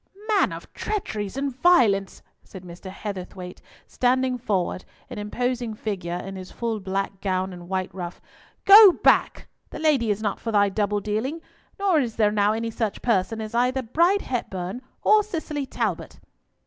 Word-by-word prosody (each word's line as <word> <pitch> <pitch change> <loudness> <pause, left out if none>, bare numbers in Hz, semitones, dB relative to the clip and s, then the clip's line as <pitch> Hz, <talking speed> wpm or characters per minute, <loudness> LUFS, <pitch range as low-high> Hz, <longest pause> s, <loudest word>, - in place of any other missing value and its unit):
"Man 420 -2 +3
of - - -9
treacheries 220 - -4
and 275 -2 -2
violence," 225 - +3 0.2
said 190 -2 -12
Mr. 175 +2 -10
Heatherthwayte, 185 -2 -7 0.2
standing 255 +1 +1
forward, 190 -5 -1 0.3
an - - -6
imposing 240 +2 -2
figure 190 -5 -4
in 195 +2 -6
his 185 0 -9
full 230 -2 -3
black 195 0 -3
gown 185 -1 -1
and 175 0 -11
white 190 -1 -2
ruff, 180 -2 -6 0.5
"go 400 -1 +10
back! - - +3 0.2
The - - -8
lady 290 -8 +2
is 205 -1 0
not 205 -2 -1
for 230 - -4
thy 205 -1 +3
double 205 +1 -1
dealing, 220 +10 -2 0.4
nor 390 -5 +2
is 240 -5 -2
there 210 -2 +3
now 205 0 +2
any 230 +1 -3
such 220 -2 -3
person 225 -1 +1
as 215 0 -6
either 250 +2 +1
Bride 340 - +2
Hepburn 195 -3 -4 0.2
or 430 0 +5
Cicely 315 -8 -4
Talbot." - - -3
215 Hz, 160 wpm, -24 LUFS, 195-260 Hz, 0.5 s, go